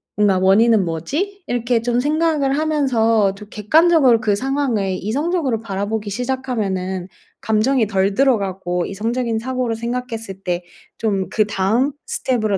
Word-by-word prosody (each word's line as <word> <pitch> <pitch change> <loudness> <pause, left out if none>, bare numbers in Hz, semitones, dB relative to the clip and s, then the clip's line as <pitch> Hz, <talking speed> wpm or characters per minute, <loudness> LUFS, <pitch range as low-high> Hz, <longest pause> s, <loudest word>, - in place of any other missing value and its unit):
뭔가 205 -2 +3
원인은 200 +2 +4
뭐지?' 310 - -3
이렇게 240 -1 0
좀 240 +1 0
생각을 295 -1 +1
하면서 230 -10 +2
좀 210 +1 -12
객관적으로 265 - +4
그 210 -2 +1
상황을 245 -6 -1
이성적으로 275 - -1
바라보기 205 0 -3
시작하면은 200 -7 -2 0.3
감정이 220 +2 +2
덜 195 0 +1
들어가고 195 -8 0
이성적인 230 +3 -2
사고를 250 -1 -2
생각했을 225 -4 -5
때 175 -1 -2 0.4
좀 195 -4 -1
그 215 - +2
다음 220 +7 +1
스텝으로 215 -6 0
225 Hz, 330 characters per minute, -19 LUFS, 200-260 Hz, 0.4 s, 원인은